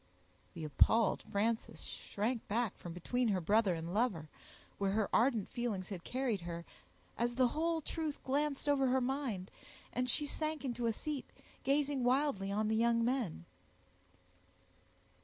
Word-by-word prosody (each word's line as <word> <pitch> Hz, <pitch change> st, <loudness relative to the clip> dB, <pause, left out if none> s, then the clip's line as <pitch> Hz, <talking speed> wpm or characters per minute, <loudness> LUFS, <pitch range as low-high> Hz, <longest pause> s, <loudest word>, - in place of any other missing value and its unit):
The 165 Hz, -, -5 dB
appalled 205 Hz, -, +4 dB
Frances 220 Hz, +3 st, 0 dB
shrank 225 Hz, +3 st, -3 dB
back 225 Hz, 0 st, 0 dB
from 175 Hz, -, -8 dB
between 240 Hz, +9 st, 0 dB
her 195 Hz, -4 st, +2 dB
brother 205 Hz, +1 st, +3 dB
and 165 Hz, +2 st, -5 dB
lover, 200 Hz, -9 st, 0 dB, 0.5 s
where 195 Hz, -1 st, +1 dB
her 215 Hz, -1 st, +2 dB
ardent 230 Hz, -3 st, +3 dB
feelings 215 Hz, -6 st, -2 dB
had 185 Hz, -4 st, -6 dB
carried 250 Hz, -6 st, -1 dB
her, 170 Hz, 0 st, -5 dB, 0.5 s
as 240 Hz, +1 st, +1 dB
the 255 Hz, -1 st, +4 dB
whole 325 Hz, +3 st, 0 dB
truth 310 Hz, -1 st, -3 dB
glanced 285 Hz, +1 st, 0 dB
over 275 Hz, -2 st, +4 dB
her 260 Hz, +1 st, +3 dB
mind, 250 Hz, -7 st, -2 dB, 0.4 s
and 250 Hz, 0 st, 0 dB
she 295 Hz, +4 st, +1 dB
sank 310 Hz, 0 st, -2 dB
into 240 Hz, -2 st, -1 dB
a -, -, +3 dB
seat, 295 Hz, +4 st, -4 dB, 0.3 s
gazing 280 Hz, -1 st, +2 dB
wildly 245 Hz, -6 st, +2 dB
on 210 Hz, +2 st, +1 dB
the 220 Hz, -, +2 dB
young 230 Hz, 0 st, +3 dB
men. 235 Hz, -, -1 dB
235 Hz, 150 wpm, -35 LUFS, 200-270 Hz, 0.5 s, appalled